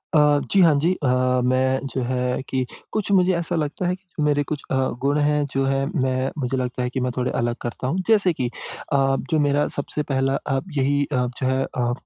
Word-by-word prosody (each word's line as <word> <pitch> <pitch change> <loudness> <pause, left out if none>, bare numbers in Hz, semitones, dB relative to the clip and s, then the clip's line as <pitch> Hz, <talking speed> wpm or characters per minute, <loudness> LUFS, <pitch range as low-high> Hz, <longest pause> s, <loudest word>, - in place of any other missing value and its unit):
अ, 150 -1 +5
जी, 195 - +5
हाँ 165 -3 +6
जी। 170 +5 +2
अ, - - +2 0.4
मैं 130 +1 +2
जो 130 - -1
है 125 0 -1
कि 130 -1 0 0.3
कुछ 210 -2 -2
मुझे 185 -1 +4
ऐसा 170 +1 -2
लगता 155 +3 -2
है 180 - 0
कि 185 -5 -6
मेरे 145 -1 +2
कुछ 150 - -2
अ, - - +2 0.3
गुण 140 +2 +2
हैं 150 0 +2
जो 135 0 +1
है, 135 0 +1
मैं 130 -2 -1
मुझे 130 -1 -1
लगता 125 0 -2
है 125 - -1
कि 130 - -3
मैं 125 0 0
थोड़े 125 0 0
अलग 120 0 0
करता 120 +2 -4
हूँ। 160 - -1
जैसे 200 -6 +4
कि 125 -4 -2 0.5
अ, 135 -1 +3 0.2
जो 155 - +3
मेरा 145 0 +2
सबसे 150 +1 -3
पहला 135 0 +1
अ, 135 -1 +1 0.2
यही 140 +1 +2
अ, 125 -1 +2 0.2
जो 130 - 0
है 130 0 +1
अ, 120 -2 -2
135 Hz, 225 wpm, -23 LUFS, 130-150 Hz, 0.5 s, हाँ